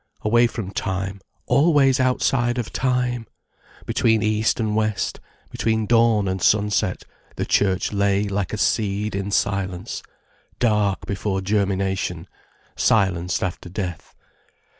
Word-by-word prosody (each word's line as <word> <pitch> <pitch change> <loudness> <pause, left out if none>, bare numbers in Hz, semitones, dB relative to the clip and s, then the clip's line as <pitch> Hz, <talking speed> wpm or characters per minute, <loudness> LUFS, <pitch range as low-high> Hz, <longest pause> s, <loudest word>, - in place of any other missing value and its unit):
Away 120 +3 +4
from 110 -5 -6
time, 95 0 -3 0.2
always 140 0 +4
outside 125 -1 +1
of 120 -3 -4
time! 125 -3 0 0.6
Between 110 -1 +2
east 110 +2 +1
and 110 -2 0
west, 110 -1 -1 0.3
between 110 -1 0
dawn 115 -3 +3
and 95 0 -2
sunset, 105 -2 +1 0.3
the - - -2
church 95 0 +1
lay 100 0 +2
like 100 -2 -2
a 110 - -3
seed 105 -1 0
in 100 +1 -3
silence, 95 -3 -1 0.6
dark 105 -4 +1
before 100 0 -2
germination, 95 -3 -1 0.5
silenced 90 -5 +1
after 90 -1 -4
death. 90 -4 -6
105 Hz, 120 wpm, -22 LUFS, 95-115 Hz, 0.6 s, Away